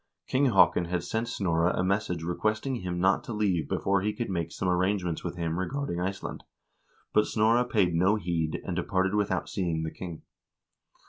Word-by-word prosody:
King 135 Hz, +2 st, +2 dB
Haakon 90 Hz, -5 st, +4 dB
had 85 Hz, 0 st, -2 dB
sent 110 Hz, +6 st, -2 dB
Snorre 85 Hz, -6 st, +1 dB
a 90 Hz, -, +1 dB
message 95 Hz, -3 st, 0 dB
re 90 Hz, +2 st, -1 dB
questing 110 Hz, +7 st, -1 dB
him 90 Hz, -1 st, -3 dB
not 95 Hz, +2 st, +3 dB
to 115 Hz, -, -5 dB
leave 100 Hz, -6 st, 0 dB
before 100 Hz, -1 st, +1 dB
he 105 Hz, +2 st, 0 dB
could 120 Hz, -3 st, -3 dB
make 85 Hz, -2 st, -2 dB
some 95 Hz, -, -3 dB
arrangements 90 Hz, -1 st, 0 dB
with 85 Hz, -1 st, -4 dB
him 85 Hz, 0 st, -2 dB
regarding 130 Hz, -2 st, -2 dB
Iceland, 95 Hz, +2 st, -4 dB, 0.7 s
but 105 Hz, -, +4 dB
Snorre 115 Hz, +3 st, +3 dB
paid 100 Hz, -8 st, +2 dB
no 90 Hz, +5 st, +3 dB
heed, 85 Hz, -6 st, -1 dB
and 90 Hz, -, -3 dB
departed 95 Hz, +2 st, 0 dB
without 105 Hz, -1 st, 0 dB
seeing 85 Hz, -5 st, -1 dB
the 80 Hz, -, -3 dB
king. 85 Hz, -4 st, -8 dB
95 Hz, 185 wpm, -28 LUFS, 85-105 Hz, 0.7 s, Haakon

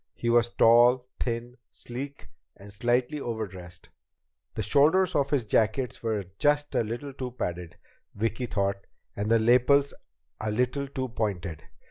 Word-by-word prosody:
He 120 Hz, -, -1 dB
was 120 Hz, 0 st, +4 dB
tall, 120 Hz, +2 st, +5 dB
thin, 120 Hz, +1 st, -3 dB
sleek, 125 Hz, -5 st, -8 dB, 0.3 s
and 100 Hz, +1 st, -12 dB
slightly 120 Hz, +7 st, 0 dB
overdressed. 95 Hz, -8 st, -7 dB, 0.7 s
The -, -, -2 dB
shoulders 160 Hz, +6 st, +4 dB
of 140 Hz, -2 st, +1 dB
his 140 Hz, -4 st, +1 dB
jacket 110 Hz, +4 st, 0 dB
were 110 Hz, -4 st, -2 dB
just 145 Hz, 0 st, +2 dB
a -, -, +2 dB
little 120 Hz, +6 st, -5 dB
too 130 Hz, -1 st, -5 dB
padded, 85 Hz, -1 st, -4 dB, 0.4 s
Vicki 115 Hz, +4 st, -2 dB
thought, 100 Hz, -2 st, -2 dB, 0.3 s
and 105 Hz, +1 st, -2 dB
the 115 Hz, -, +5 dB
lapels 125 Hz, +5 st, +4 dB, 0.5 s
a 110 Hz, -, -2 dB
little 125 Hz, +5 st, 0 dB
too 130 Hz, -1 st, -4 dB
pointed. 95 Hz, -8 st, -3 dB
120 Hz, 140 wpm, -27 LUFS, 105-130 Hz, 0.7 s, tall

